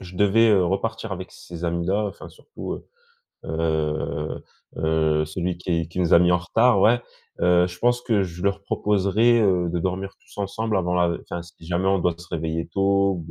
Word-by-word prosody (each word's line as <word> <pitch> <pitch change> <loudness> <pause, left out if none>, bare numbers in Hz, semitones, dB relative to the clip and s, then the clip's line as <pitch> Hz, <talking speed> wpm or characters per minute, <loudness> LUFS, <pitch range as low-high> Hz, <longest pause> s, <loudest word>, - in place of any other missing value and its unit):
je 90 -1 -11
devais, 105 +3 +4
heu, 95 -4 +4
repartir 110 +3 -2
avec 95 0 -6
ces 85 0 -9
amis-là, 85 +5 0
enfin, 100 - -8
surtout, - - -8
heu, - - -10 0.6
heu, 80 -1 -2 0.4
heu, 80 -1 +1
celui 90 +3 -3
qui 85 -2 -1
qui 85 - -8
nous 90 0 +4
a - - +8
mis 90 0 +4
en 90 - +3
retard, 110 +4 +3
ouais. 120 +4 +4 0.4
Heu, 90 0 +4
je 90 0 -9
pense 120 +4 +2
que 110 -4 +1
je 90 -1 -6
leur 100 0 0
proposerais, 105 +4 +2
heu, 90 -4 +2
de 85 - -1
dormir 95 +3 -3
tous - - -19
ensemble 105 +2 -1
avant 90 -1 0
la 85 -1 +2
enfin, 85 - -6
si 85 -1 -16
jamais 90 +2 0
on 95 0 +3
doit 90 -1 +1
se 85 +1 -13
réveiller 80 0 -3
tôt, 100 +1 +2
ou 80 - -7
90 Hz, 200 wpm, -23 LUFS, 85-100 Hz, 0.6 s, a